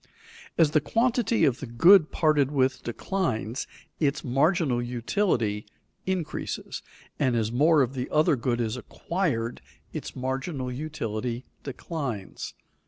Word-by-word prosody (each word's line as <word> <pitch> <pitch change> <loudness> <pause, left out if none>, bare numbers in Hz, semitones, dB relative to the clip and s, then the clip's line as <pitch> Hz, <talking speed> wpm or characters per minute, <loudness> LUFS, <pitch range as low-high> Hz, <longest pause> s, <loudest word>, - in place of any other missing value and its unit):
As 160 -3 +5
the 155 -1 +3
quantity 230 - +2
of 135 -3 +1
the 140 - -6
good 165 +8 +6
parted 150 -4 +3
with 135 -2 +1
declines, 120 - -2 0.3
its 140 -3 +1
marginal 140 0 +2
utility 120 - 0 0.4
increases; 185 -5 -3 0.4
and 130 -4 +2
as 110 -1 0
more 150 +4 +5
of 125 +1 -3
the 130 -2 -3
other 155 -1 +4
good 120 -1 -1
is 115 -1 -1
acquired, 125 - -2 0.3
its - - -6
marginal 130 +1 -3
utility 125 -4 -4 0.2
declines. 135 - -5
135 Hz, 120 wpm, -27 LUFS, 120-160 Hz, 0.4 s, good